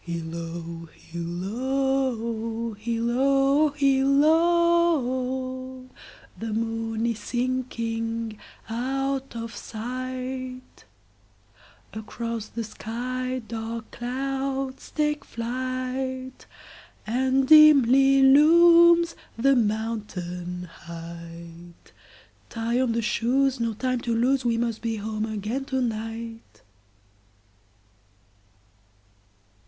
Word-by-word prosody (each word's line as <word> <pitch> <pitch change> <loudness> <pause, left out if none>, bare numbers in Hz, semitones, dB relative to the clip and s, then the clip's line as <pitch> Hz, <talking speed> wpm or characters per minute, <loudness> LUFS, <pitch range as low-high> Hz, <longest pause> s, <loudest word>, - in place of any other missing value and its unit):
Hilloo, 165 0 -6
hilloo, 230 +5 -2
hilloo, 265 +7 +2
hilloo! 275 -3 +2 0.5
The 225 0 -4
moon 225 0 -2
is 230 -2 -1
sinking 230 -2 -3 0.3
out 270 +3 -2
of 230 0 -6
sight, 255 +2 -6 1.1
Across 225 +1 -5
the 230 +1 -5
sky 255 +3 -4
dark 225 0 -5
clouds 270 +2 -3
take 300 -1 -1
flight, 255 +2 -4 0.6
And 260 +3 +1
dimly 275 -3 +7
looms 335 +4 +6 0.2
the 275 +4 +4
mountain 205 -6 -2
height; 170 0 -11 0.6
Tie 235 +2 -1
on 250 -3 +1
the 230 0 -1
shoes, 250 +5 +1
no 230 -2 -1
time 255 +1 -1
to 235 -1 -1
lose, 255 +3 +2
We 235 -2 +1
must 230 -1 -2
be 230 -1 -2
home 215 +1 -3
again 220 +5 -3
to 265 -1 -1
night. 225 -1 -5
240 Hz, 80 wpm, -25 LUFS, 225-265 Hz, 1.1 s, dimly